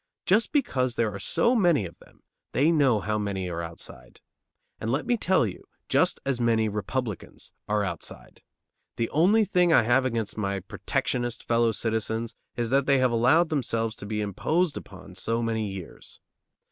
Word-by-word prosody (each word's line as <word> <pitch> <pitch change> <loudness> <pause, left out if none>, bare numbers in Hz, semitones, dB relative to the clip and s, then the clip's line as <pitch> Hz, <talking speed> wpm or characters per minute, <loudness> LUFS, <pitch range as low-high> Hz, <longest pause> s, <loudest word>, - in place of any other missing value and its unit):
Just 215 +5 +3
because 130 - 0
there 110 -3 0
are 100 - -6
so 235 - +2
many 175 - +3
of 85 - -9
them, - - -21 0.3
they 145 +5 +3
know 135 -9 +3
how 105 +2 -1
many 100 -3 -2
are 85 -1 -3
outside. 85 -6 -10 0.6
And 110 - -2
let 135 +4 0
me 245 - +2
tell 190 - +2
you, 100 - -6 0.3
just - - +2
as 135 -3 -1
many 115 -2 +2
Republicans 105 +1 -4
are 105 0 +1
outside. 90 -4 -7 0.5
The 115 - -2
only 200 +9 +4
thing 180 -3 +3
I 120 - +6
have 120 +4 +3
against 115 -4 -2
my 100 -1 -1
protectionist 120 +5 -3
fellow 115 -1 +3
citizens 110 +1 -2 0.2
is 120 -1 -2
that 135 0 +2
they 140 -1 +5
have 130 -1 +3
allowed 130 +9 +4
themselves 115 -6 -1
to 100 - -8
be 105 0 -2
imposed 155 - 0
upon 95 -1 -10
so 115 +5 -2
many 110 -2 -1
years. 95 -3 -9
115 Hz, 170 wpm, -26 LUFS, 105-140 Hz, 0.6 s, I